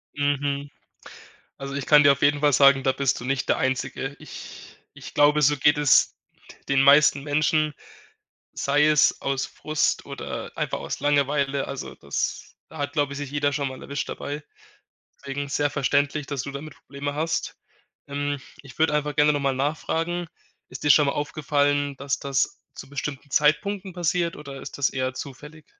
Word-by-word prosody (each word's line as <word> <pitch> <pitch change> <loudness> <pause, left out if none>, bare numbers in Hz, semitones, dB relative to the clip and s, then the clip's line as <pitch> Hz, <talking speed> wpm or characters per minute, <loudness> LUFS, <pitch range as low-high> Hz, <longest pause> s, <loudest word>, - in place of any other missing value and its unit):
Mhm. 145 0 -1 0.9
Also, 135 0 -6
ich 140 -2 -4
kann 150 -1 +7
dir 140 - +7
auf 140 - -6
jeden 145 0 +3
Fall 145 -1 +3
sagen, 140 0 +6
da 130 - +2
bist 135 -2 0
du - - -8
nicht 135 0 -1
der - - +2
Einzige. 130 +1 -2
Ich - - -11 0.2
ich - - -11
glaube, 150 +1 +4
so 145 +1 +4
geht 150 +2 +3
es 145 -3 +4 0.5
den 135 -1 +3
meisten 140 0 +6
Menschen, 155 +1 +1 0.8
sei 145 +2 +2
es 150 -1 +3
aus 135 -1 -1
Frust 155 0 -1
oder - - -6
einfach - - -2
aus - - -5
Langeweile. 140 -1 +1
Also 135 - -6
das - - -4
da 160 - -12
hat, 145 0 -3
glaube 145 -2 0
ich, - - -6
sich 145 -1 -6
jeder 145 -1 0
schon 140 0 -1
mal 130 0 -8
erwischt 140 +1 -4
dabei. 145 +1 -5 0.8
Deswegen 140 +1 -5
sehr 145 +1 0
verständlich, 145 +1 0
dass 140 -2 -3
du 140 - -6
damit 140 +2 -8
Probleme 145 +1 -6
hast. 160 +2 -2 0.5
Ähm, 145 0 -2 0.2
ich 140 -2 -14
würde 160 -1 +3
einfach 150 0 -1
gerne 150 0 +5
noch 145 - -1
mal 135 -1 +1
nachfragen, 165 +5 -2 0.4
ist 130 - -9
dir 150 - +3
schon 145 0 +6
mal 140 - +1
aufgefallen, 145 -1 0
dass 140 +1 -2
das 140 -1 -1
zu 135 - -10
bestimmten 145 0 -5
Zeitpunkten 190 +7 +1
passiert 175 -1 -1
oder 140 -2 -9
ist - - -9
das 140 - +2
eher 130 -1 -2
zufällig? 150 +4 -9
145 Hz, 175 wpm, -24 LUFS, 140-150 Hz, 0.9 s, kann